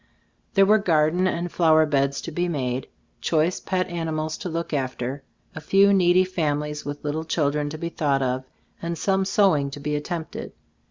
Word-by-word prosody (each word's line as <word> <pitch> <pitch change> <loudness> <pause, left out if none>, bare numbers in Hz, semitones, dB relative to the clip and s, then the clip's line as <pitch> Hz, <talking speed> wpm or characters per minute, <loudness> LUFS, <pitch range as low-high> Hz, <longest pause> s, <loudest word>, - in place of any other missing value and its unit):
There 195 -1 +6
were 215 +2 +5
garden 170 -1 +2
and 175 -1 -2
flower 160 -2 +4
beds 140 -2 0
to 165 - -6
be 175 +3 -1
made, 130 -6 -2 0.3
choice 165 +2 +1
pet 185 -1 -1
animals 160 -3 -3
to 185 - -4
look 165 0 -4
af 130 -3 -1
ter, 130 +3 -4 0.3
a 160 - -7
few 195 +5 +4
needy 180 -1 +5
families 150 -4 -2
with 145 +1 -6
little 150 +2 -2
children 150 -2 0
to 155 - -6
be 170 +2 -4
thought 140 -5 0
of, 130 0 -1 0.4
and 170 0 -3
some 190 +1 +1
sewing 190 -8 +3
to 140 - -8
be 150 +1 -2
attempted. 160 +2 -5
160 Hz, 180 wpm, -24 LUFS, 145-175 Hz, 0.4 s, There